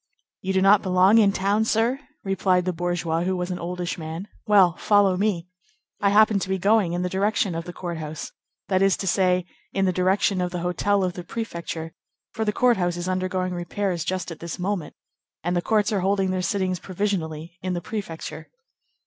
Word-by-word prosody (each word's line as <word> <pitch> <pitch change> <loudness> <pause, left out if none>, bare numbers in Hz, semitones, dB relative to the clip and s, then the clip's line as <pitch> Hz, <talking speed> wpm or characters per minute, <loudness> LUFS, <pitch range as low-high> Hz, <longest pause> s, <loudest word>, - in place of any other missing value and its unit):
"You 190 - -2
do 190 0 +2
not 195 +1 +6
belong 185 +4 +5
in 205 -2 +5
town, 200 +3 +1
sir?" 230 +4 +1 0.2
replied 185 -2 +1
the 185 - 0
bourgeois, 170 -1 -1
who 185 +1 0
was 180 +1 -3
an 180 - -3
oldish 175 +1 -4
man; 160 +4 -6 0.2
"well, 190 -5 +5
follow 205 -3 +4
me. 185 -3 0 0.5
I 200 - +3
happen 210 0 +5
to 190 - -4
be 190 - +1
going 200 -2 +3
in 175 +1 -1
the - - 0
direction 200 0 +1
of 165 0 -4
the 175 - -6
court 175 -2 -5
house, 155 0 -6 0.4
that 190 -1 +2
is 195 -1 +4
to - - -4
say, 180 -1 +2 0.3
in 195 0 +1
the 185 - +1
direction 185 +1 +2
of 180 - 0
the 175 -1 -4
hotel 195 +3 +1
of 180 -1 -1
the 180 - -7
prefecture; 170 -5 -5 0.4
for 220 - -2
the 210 - +1
court 245 +2 +3
house 175 -1 0
is 175 +1 -4
undergoing 185 0 -1
repairs 175 0 -2
just 185 +1 -3
at 165 - -8
this 170 -1 -5
moment, 185 -3 -3 0.5
and 175 +2 0
the 175 - +1
courts 210 +2 +1
are 200 - +1
holding 195 0 +1
their 185 0 -1
sittings 185 -1 -1
provisionally 175 -4 -3
in 185 0 -2
the 175 - -1
prefecture." 195 -5 -6
185 Hz, 205 wpm, -24 LUFS, 175-200 Hz, 0.5 s, not